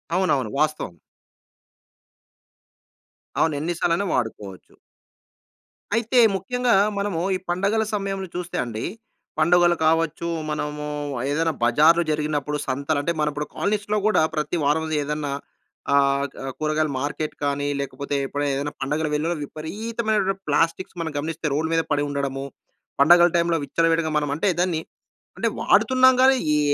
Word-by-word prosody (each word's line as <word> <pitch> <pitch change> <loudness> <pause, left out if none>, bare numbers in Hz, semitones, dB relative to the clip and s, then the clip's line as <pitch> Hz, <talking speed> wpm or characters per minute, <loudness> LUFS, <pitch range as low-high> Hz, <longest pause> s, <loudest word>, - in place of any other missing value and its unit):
అవునవును. 140 - +1
వాస్తవం. 155 - 0 2.5
అవును. 160 - +3
ఎన్ని 165 +4 -1
సార్లైనా 170 +4 +1
వాడుకోవచ్చు. 105 -6 -4 1.2
అయితే 235 +2 +2 0.2
ముఖ్యంగా 245 +6 0 0.2
మనము 200 -4 -1
ఈ - - 0
పండగల 200 +5 +1
సమయంలో 195 -2 -3
చూస్తే 180 0 -4
అండి. 115 -2 -5 0.6
పండుగలు 175 +2 +4
కావచ్చు. 165 +1 +1 0.2
మనము 150 0 -3 0.5
ఏదైనా 160 +2 +1
బజార్లు 155 +8 +5
జరిగినప్పుడు 150 -1 -1
సంతలంటే, 145 +4 -1
మన 150 - +2 0.3
కాలనీస్‌లో 210 0 0
కూడా 215 - +3
ప్రతి 155 +3 -1
వారం 155 +3 +2 0.2
ఏదన్నా 150 0 -3 0.6
ఆహ్, 140 0 +3
క - - -10 0.2
కూరగాయల 155 0 0
మార్కెట్ 150 +2 -3
కానీ 145 0 0
లేకపోతే 140 +1 -4
ఎప్పుడైనా 145 +1 -2
ఏదైనా 145 +1 -3
పండగలు 150 +3 -1
వెల్లులో 160 +4 0
విపరీతమైనటువంటి 205 +5 -2
ప్లాస్టిక్స్ 165 +3 0
మనం 165 -1 -3
గమనిస్తే 155 +2 -3
రోడ్ 160 +3 0
మీద 165 0 +3
పడి 145 0 +2
ఉండడము. 140 -1 -3 0.6
పండగల 175 +4 +7
టైంలో 170 -1 +2
విచ్చలవిడిగా 165 +1 +1
మనం 150 -1 0
అంటే 165 +6 +1
దాన్ని, 175 -3 +1 0.6
అంటే - - 0
వాడుతున్నాం 260 0 +5
గాని 265 +1 +6 0.2
ఏ, - - +3
160 Hz, 125 wpm, -23 LUFS, 145-180 Hz, 2.5 s, పండగల